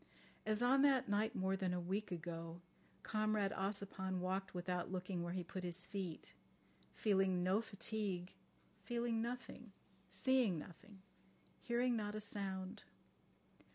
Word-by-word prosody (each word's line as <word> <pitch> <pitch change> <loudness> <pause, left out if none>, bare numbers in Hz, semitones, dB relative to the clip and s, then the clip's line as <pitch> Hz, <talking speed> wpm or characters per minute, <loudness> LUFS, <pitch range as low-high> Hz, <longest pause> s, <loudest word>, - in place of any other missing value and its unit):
As 215 +2 +2
on 265 +2 +6
that 275 -3 +5
night, 205 +2 +2
more 190 +1 +2
than 185 -2 0
a - - 0
week 190 +4 -2
ago, 165 0 -4 0.4
Comrade 215 -2 +2
Ossipon 195 -1 -2
walked 190 +1 -1
without 180 0 -1
looking 185 -1 -2
where 175 0 -2
he 185 -1 -1
put 185 +2 -5
his 180 0 0
feet, 190 -6 -4 0.6
feeling 190 -3 +3
no 190 +4 +4
fatigue, 200 -4 -2 0.5
feeling 235 -2 0
nothing, 240 -2 -5 0.3
seeing 225 0 +3
nothing, 190 +5 -10 0.6
hearing 240 0 +2
not 210 -1 -1
a - - -1
sound. 195 -2 -3
195 Hz, 130 wpm, -40 LUFS, 180-215 Hz, 0.6 s, on